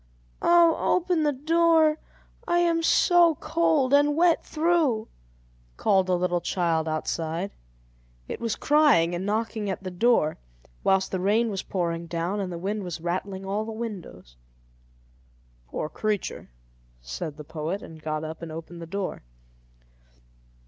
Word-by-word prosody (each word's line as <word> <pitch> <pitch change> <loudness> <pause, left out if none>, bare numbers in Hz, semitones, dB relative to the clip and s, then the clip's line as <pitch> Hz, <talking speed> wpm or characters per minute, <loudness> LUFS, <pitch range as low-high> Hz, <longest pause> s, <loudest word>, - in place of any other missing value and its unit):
"Oh, 340 -1 +4
open 355 -2 +1
the 300 -1 +2
door! 320 +2 +3 0.5
I 345 - +2
am 340 -1 +2
so 340 0 +4
cold 300 -5 +1
and 290 +1 +4
wet 340 +1 +3
through," 310 -9 +1 0.7
called 190 -2 +2
a 180 - +3
little 175 0 0
child 165 -2 0
outside. 165 +3 -2 0.8
It - - -5
was 230 -1 -1
crying 285 - +4
and 180 +3 -3
knocking 215 0 -1
at 190 - -4
the 185 - -5
door, 180 -5 +2 0.4
whilst 190 0 +2
the 185 - -1
rain 215 +5 +2
was 195 -2 -3
pouring 170 -2 -3
down 170 +4 -2
and 190 -2 -3
the 170 - -5
wind 200 +4 -3
was 175 -3 -5
rattling 190 +3 -3
all 200 +3 -1
the 225 - -6
windows. 185 - -7 1.3
"Poor 150 - -4
creature!" 210 +4 -3 0.5
said - - -6
the 150 - -8
poet, 160 +6 -4
and 160 -1 -11
got 155 0 -3
up 160 +1 -7
and 165 -1 -7
opened 165 +2 -8
the 165 - -7
door. 195 +2 -4
195 Hz, 145 wpm, -26 LUFS, -, 1.3 s, Oh